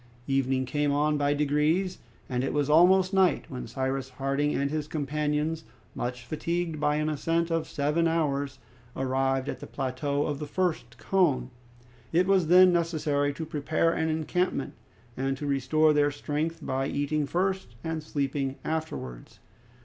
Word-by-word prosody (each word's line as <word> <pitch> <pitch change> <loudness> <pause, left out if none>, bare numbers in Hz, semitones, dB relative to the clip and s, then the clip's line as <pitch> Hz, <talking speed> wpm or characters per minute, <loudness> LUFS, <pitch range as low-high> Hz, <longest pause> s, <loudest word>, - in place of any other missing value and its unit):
Evening 135 -1 +1
came 145 +2 0
on 150 +1 +2
by 145 0 +1
degrees, 150 +6 +1 0.3
and 125 -1 -1
it 135 - -1
was 145 0 +1
almost 185 +4 +5
night 190 -2 +3
when 130 -2 -6
Cyrus 135 0 -2
Harding 140 +3 -1
and 140 0 0
his 155 -1 -2
companions, 150 +2 -1 0.3
much 125 0 -4
fatigued 165 +2 -2
by 150 0 +2
an 150 0 0
ascent 165 +3 0
of 165 -1 0
seven 150 +4 +1
hours, 145 -4 0 0.4
arrived 135 0 0
at - - -4
the - - -8
plateau 140 +2 -2
of 145 -2 -2
the 150 - -5
first 160 -9 -2
cone. 155 -10 +1 0.6
It 175 +3 +3
was 190 -3 +3
then 180 +1 +7
necessary 155 -4 +1
to 160 +3 -5
prepare 155 +2 0
an 160 - 0
encampment, 160 0 -1 0.4
and 135 +1 -1
to 145 - -5
restore 145 +3 +3
their 145 0 +3
strength 150 +3 -3
by 135 +1 -1
eating 145 +1 -1
first 190 -6 -1
and 160 -1 -3
sleeping 140 -2 -2
afterwards. 155 - -5
150 Hz, 155 wpm, -28 LUFS, 135-165 Hz, 0.6 s, then